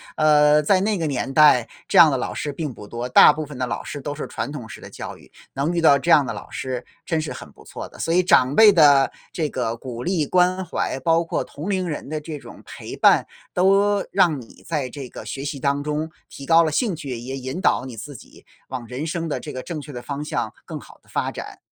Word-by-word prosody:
呃， 150 0 +5
在 185 +5 +3
那 210 0 0
个 160 - -1
年 135 -1 -3
代， 145 -6 +6 0.2
这 - - +1
样 160 -3 +9
的 135 - 0
老 - - -3
师 145 -1 -4
并 150 -2 -4
不 105 -3 -11
多， 120 +3 -5
大 - - +8
部 155 - -4
分 140 -3 -10
的 130 - -1
老 - - -4
师 145 - -6
都 145 +1 -5
是 150 - -6
传 145 - -4
统 125 -7 -8
式 - - -9
的 - - -11
教 - - -8
育， - - -20 0.2
能 145 +6 -1
遇 170 - 0
到 140 -3 +6
这 170 +5 -1
样 150 -3 +7
的 115 - -3
老 105 - -8
师 130 -2 -4 0.2
真 160 -2 0
是 155 - -4
很 - - -10
不 - - -18
错 - - -8
的。 - - -16
所 165 - -1
以 180 - +5
长 140 -7 +4
辈 220 -2 +8
的 145 -6 +5 0.2
这 155 -3 -1
个 120 -3 -2
鼓 120 0 -7
励 170 -6 0
关 185 +1 +2
怀， 160 -5 -3
包 165 +4 +2
括 165 - -2
同 155 +8 -7
龄 185 -2 -1
人 150 - -5
的 155 0 -4
这 150 -1 -6
种 - - -13
陪 - - -9
伴， - - +4 0.3
都 195 +2 +3
让 175 -7 +3
你 115 - -15
在 145 -6 -2
这 135 -3 -8
个 - - -10
学 135 - -5
习 140 -1 -4
当 140 +1 0
中 150 +2 -3 0.2
提 140 - -10
高 165 +2 +5
了 155 - 0
兴 210 - 0
趣， 135 -6 -6
也 130 +3 -6
引 130 +6 -5
导 130 - +1
你 120 -4 -9
自 145 +5 -8
己 - - -15 0.2
往 125 -3 -5
人 130 +7 -5
生 165 0 -3
的 150 - -2
这 150 - -8
个 130 - -6
正 160 -4 -5
确 145 - -10
的 120 -2 -7
方 145 +1 -5
向 - - -3
更 - - -6
好 - - -16
地 - - -27
发 - - -2
展。 - - -9
150 Hz, 275 characters per minute, -22 LUFS, 130-165 Hz, 0.3 s, 样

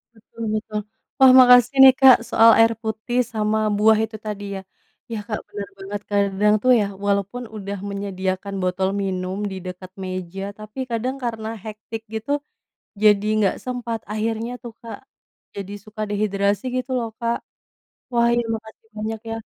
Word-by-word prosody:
Betul 225 +1 -14
betul. 215 0 -3 0.4
Wah, 265 -1 +9
makasih 250 0 +7
nih 265 -1 +10
Kak, 265 -2 +9
soal 230 0 +7
air 225 0 +6
putih 220 +3 -2
sama 215 0 0 0.2
buah 215 +1 +5
itu 220 0 -10
tadi 205 -1 -4 0.2
ya - - -9 0.5
ya 220 - -2
Kak 210 -3 -2
benar 200 -2 -7
banget 200 +1 -5
kadang 200 +1 +2
itu 235 - -4
ya - - +1 0.2
walaupun 200 +5 -1
udah 200 0 -5
menyediakan 195 0 -3
botol 185 +1 0
minum 185 0 -3
di - - -5
dekat 185 0 -8
meja, 185 0 -5 0.2
tapi 215 +4 -10
kadang 240 +3 -1
karena 225 -2 -3 0.2
hectic 220 +1 -7
gitu, 220 +5 -4 0.7
jadi 210 -1 +5
nggak 200 -3 +2
sempat 240 -3 -3
akhirnya 225 +2 -2
tuh 235 -2 -8
Kak, 230 - -8 0.6
jadi 200 0 -6
suka 215 0 -7
dehidrasi 200 0 0
gitu 255 +1 -3
loh 230 -2 -3
Kak. 235 0 0 0.8
Wah 235 0 +4
iya 240 -1 0
makasih 220 0 -12
banyak 220 +1 -3
ya - - -2
215 Hz, 155 wpm, -22 LUFS, 200-230 Hz, 0.8 s, nih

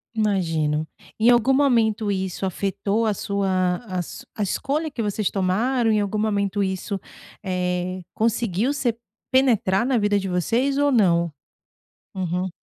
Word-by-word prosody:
Imagino. 165 -8 0 0.3
Em 230 +2 +5
algum 240 +3 +4
momento, 225 -6 +2
isso 190 0 -2
afetou 200 +4 -1
a 215 - +2
sua 185 -3 0
a 185 -3 -2
su - - -10
a 210 - -1
escolha 295 - -1
que 240 - -4
vocês 210 -1 -1
tomaram? 225 +6 +1
Em 215 - +3
algum 205 +1 -2
momento 205 -2 0
isso, 190 +1 -2 0.4
eh, 180 0 -2
conseguiu 230 +2 0
ser 245 -5 0 0.4
penetrar 235 -6 +3
na 260 -3 +2
vida 205 -1 +2
de 195 -1 -4
vocês 235 +10 +1
ou 285 0 +3
não? 170 -8 +3 0.8
Uhum. 185 0 -2
205 Hz, 140 wpm, -23 LUFS, 185-230 Hz, 0.8 s, Em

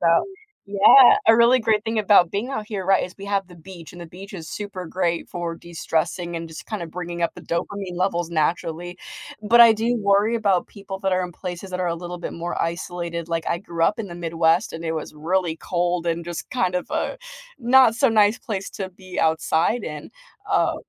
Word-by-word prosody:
about 165 -1 +3 0.4
yeah, 205 +6 +7
a 225 0 +7
really 235 +2 +5
great 220 -3 +1
thing 225 0 -2
about 200 -5 +5
being 205 +6 -2
out 215 -6 -4
here, 195 -4 -4
right, 195 - +4
is 180 - -10
we 195 - -8
have 200 -2 -1
the 175 - -14
beach, 170 -1 -12
and 175 - -11
the 170 - -8
beach 190 +5 -12
is 165 -5 -8
super 200 -3 -6
great 170 0 -2
for 170 -1 -4
destressing 170 +1 -3
and 165 0 -5
just 160 -1 -10
kinda 210 -6 -4
bringing 175 +1 -6
up 170 - 0
the - - -10
dopamine 180 +2 -4
levels 175 -2 -1
naturally. 170 +2 -2 0.5
But 235 +3 +5
I 230 -1 +9
do 230 +3 0
worry 205 +2 +2
about 200 -5 +1
people 195 -1 -8
that 195 -1 0
are 185 0 +1
in 180 - -8
places 180 +1 -7
that 185 - -3
are 180 - 0
a 170 - -2
little 175 +1 -6
bit - - -6
more 170 +1 -3
isolated, 170 0 -4
like, 165 -1 -2
I 170 - 0
grew 170 -2 -5
up 210 - +2
in 220 - -4
the 175 - -9
Midwest 165 +2 +1
and 165 +1 -7
it 160 - -1
was 155 -2 -5
really 165 +2 -1
cold 175 0 -1
and 170 0 -1
just 175 -1 -6
kind 185 -7 0
of 180 - -4
a - - -2 0.4
not 245 -2 +5
so 270 +1 +4
nice 215 0 +3
place 195 -4 -5
to 190 -2 -5
be 185 0 -10
outside 160 +7 +1
in. 150 -4 -7 0.4
Uh, - - +2
180 Hz, 220 wpm, -23 LUFS, 170-205 Hz, 0.5 s, I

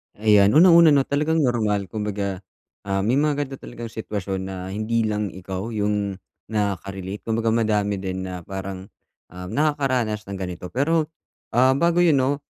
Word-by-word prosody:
Ayan, 105 +1 +4
una-una 165 -3 +7
'no, 135 - +4
talagang 150 +3 +1
normal, 105 -6 0
kumbaga, 100 -3 -3 0.5
ah, 95 0 0
may 125 +6 +2
mga 150 -1 +2
ganito 140 -2 -4
talagang 120 -1 -8
sitwasyon 100 -4 -4
na 95 - -6 0.2
hindi 110 +3 0
lang 105 -1 -1
ikaw 95 +4 -6
yung 105 -2 -1 0.3
nakaka-relate. 100 -2 -3
Kumbaga 115 0 +1
madami 105 -3 +1
din 95 -1 -4
na 90 -1 -5
parang, 95 +1 -7 0.4
ah, 90 +1 -10
nakakaranas 130 -6 0
ng 100 -1 -7
ganito. 90 -1 -6
Pero, 155 +4 +1 0.4
ah, 130 +3 +4
bago 170 +4 +2
yun 165 -4 +5
'no, 135 +2 +1
105 Hz, 155 wpm, -23 LUFS, 100-135 Hz, 0.5 s, una-una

